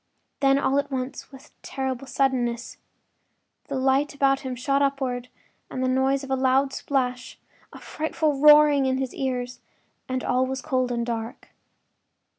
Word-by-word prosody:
Then 275 -1 +4
all 280 0 +2
at 285 0 -3
once, 260 +1 -5
with 270 -1 -15
terrible 265 -1 -4
suddenness, 245 -3 -1 0.9
the 280 - -4
light 270 +2 +1
about 275 -1 +2
him 260 -2 -5
shot 275 +3 0
upward 265 -3 -1 0.4
with - - -6
the 260 - 0
noise 265 +2 +1
of 270 - -7
a - - +3
loud 265 +1 +2
splash; 250 -3 -2 0.3
a - - -11
frightful 310 -2 -2
roaring 295 -1 +6
was - - +2
in - - -1
his 265 -1 -3
ears, 250 -2 -3 0.5
and 255 0 -2
all 255 +1 +1
was 265 0 -4
cold 255 -4 0
and 235 -1 -1
dark. 230 0 -5
265 Hz, 160 wpm, -25 LUFS, 255-275 Hz, 0.9 s, roaring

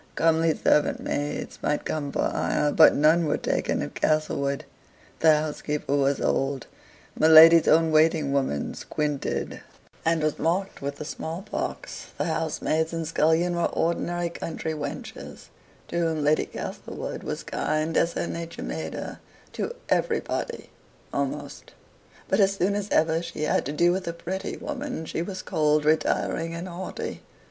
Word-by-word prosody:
Comely 165 0 +3
servant 150 - +2
maids 145 +1 -3
might 150 - -1
come 145 -2 -2
for - - 0
hire, 150 0 +1
but - - +7
none 155 +3 +4
were 150 - +1
taken - - -1
at - - -6
Castlewood. 140 -3 0 0.5
The 155 -2 +6
housekeeper 150 -1 -2
was 140 0 +2
old; 135 -2 0 0.5
my 155 - +3
lady's 160 +1 +9
own 160 +1 +5
waiting 155 -2 +3
woman 130 - -1
squinted, 150 -2 -3 0.4
and 165 -1 +1
was 155 -1 0
marked 185 +4 -1
with 140 0 -3
the 150 - -7
small 160 +3 -5
pox; 210 - -5
the - - 0
housemaids 160 +1 -1
and 165 -1 -3
scullion 165 +2 +2
were 170 - +1
ordinary 175 +1 -1
country 160 -1 -4
wenches, 145 -2 -7 0.4
to 170 - -1
whom 160 -3 0
Lady 150 +1 +2
Castlewood - - -6
was - - -4
kind, 155 +1 -1
as 170 0 +2
her - - -2
nature 170 0 -6
made - - -4
her - - -6 0.3
to 480 - -3
everybody 475 0 -1 0.4
almost; - - -4 0.5
but - - +1
as 195 -1 +4
soon 195 +1 +1
as 205 0 -3
ever 160 +1 +2
she 170 -2 -5
had 150 - +1
to - - -2
do 170 +4 +3
with 185 0 -2
a 170 - -2
pretty 185 +3 -5
woman, 280 - -5
she 160 - -3
was 185 +2 -5
cold, 150 -1 +1
retiring, 165 +1 +1
and 170 +2 -5
haughty. 180 +1 -6
160 Hz, 155 wpm, -26 LUFS, 150-170 Hz, 0.5 s, lady's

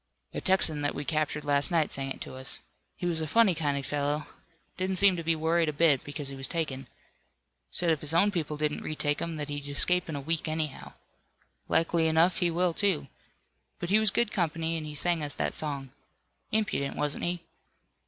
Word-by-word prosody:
"A - - -4
Texan 175 -6 +3
that 145 - -1
we 145 - -4
captured 150 -1 -1
last 145 0 +4
night 165 -3 +1
sang 135 0 -2
it - - -6
to - - -7
us. 130 0 -6 0.4
He - - -5
was 165 -2 0
a 155 - -2
funny 225 +2 +4
kind 145 -3 -1
of 140 - -4
fellow. 145 +1 -1 0.5
Didn't 185 +1 -1
seem 195 0 +5
to 170 - -3
be 165 0 +1
worried 160 +1 +1
a - - -3
bit 150 -3 +3
because 145 -1 -5
he 135 - -6
was 135 0 -2
taken. 135 -6 -2 0.8
Said 170 - +2
if 155 - 0
his 150 +2 0
own 200 +5 +5
people 155 -5 -3
didn't 150 0 -1
retake 145 -1 0
him 170 -1 -3
that 150 -2 -4
he'd 145 -1 -4
escape 180 +5 +2
in 155 - -3
a - - -3
week, 160 +3 -1
anyhow. 155 -3 -3 0.7
Likely 165 0 +2
enough 165 +5 +3
he 175 -3 +2
will, 175 +1 +1
too. 170 -8 0 0.7
But 175 +1 -4
he 210 - +6
was 220 -1 +3
good 230 +2 +1
company, 165 -2 -1
and 155 -1 -4
he 150 - -7
sang 170 +2 +1
us 145 - -2
that - - -1
song. 140 -4 -3 0.6
Impudent, 210 -10 0
wasn't 150 0 -1
he?" 175 0 -2
160 Hz, 210 wpm, -29 LUFS, 145-175 Hz, 0.8 s, he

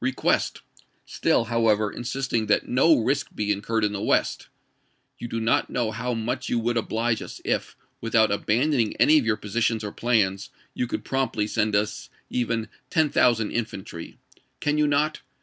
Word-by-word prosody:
request; 130 - 0 0.4
still, - - +1
however, 110 -2 +2
insisting 120 -2 -2
that 105 - +2
no 135 +6 +4
risk 135 +5 0
be 105 -1 0
iueurred 110 +2 -2
in 105 -1 +1
the 100 - -4
West: - - 0 0.4
" - - -44
You 120 - -5
do 115 -1 -3
not 115 +1 +1
know 120 -3 -1
how 125 +2 -3
much 120 +3 -3
you 120 - +1
would 120 +1 0
oblige 115 0 0
us - - -8
if, - - -1 0.3
without 115 -2 +3
abandoning 115 +4 +1
any 155 +1 +5
of 120 - -3
your 110 -2 +2
positions 110 +1 -1
or 105 - -4
plans, 100 -5 0 0.2
you 125 - -2
could - - -4
promptly 135 -6 0
send 105 0 0
us 105 +1 -1 0.2
even 115 -2 -1 0.2
ten 155 -3 +2
thousand 115 -4 +3
infantry. 100 -7 -5 0.4
Can 150 0 0
you 150 - +3
not? 150 +2 +1
115 Hz, 170 wpm, -25 LUFS, 105-125 Hz, 0.4 s, any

